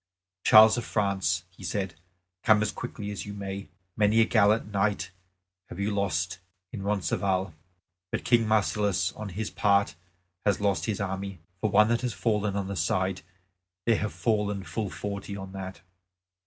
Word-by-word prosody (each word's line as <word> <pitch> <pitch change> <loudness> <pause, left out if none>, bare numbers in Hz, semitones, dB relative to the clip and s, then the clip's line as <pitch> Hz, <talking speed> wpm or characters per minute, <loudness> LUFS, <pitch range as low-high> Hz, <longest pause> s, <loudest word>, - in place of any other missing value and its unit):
"Charles 110 +2 +8
of - - -5
France," 95 -5 0
he 95 - -15
said, 95 -4 -2 0.5
"come 105 -1 +5
as 105 - -1
quickly 105 0 -6
as 105 - -6
you 100 - -6
may! 100 0 -6 0.3
Many 105 +1 +3
a - - +5
gallant 110 -1 +3
knight 100 -2 0 0.6
have 90 - -8
you 100 +2 0
lost 90 -2 -1 0.3
in 100 - -6
Roncesvalles. 95 -2 0 0.6
But - - -3
King 115 -2 +4
Marsilas, 105 -3 +1
on 110 -1 -7
his 100 +3 -4
part, 100 -4 +2 0.5
has 100 - +2
lost 100 -1 0
his 110 -1 -1
army. 100 -1 -3 0.2
For 110 - 0
one 105 +2 +5
that 115 0 +1
has 125 -3 -2
fallen 105 -3 0
on 100 -1 -2
this 100 -1 -2
side 95 0 0 0.6
there 115 -2 +4
have 110 - -2
fallen 105 -3 0
full 105 +2 -3
forty 100 0 -5
on 95 -1 -7
that." 95 -1 -7
100 Hz, 165 wpm, -28 LUFS, 95-105 Hz, 0.6 s, Charles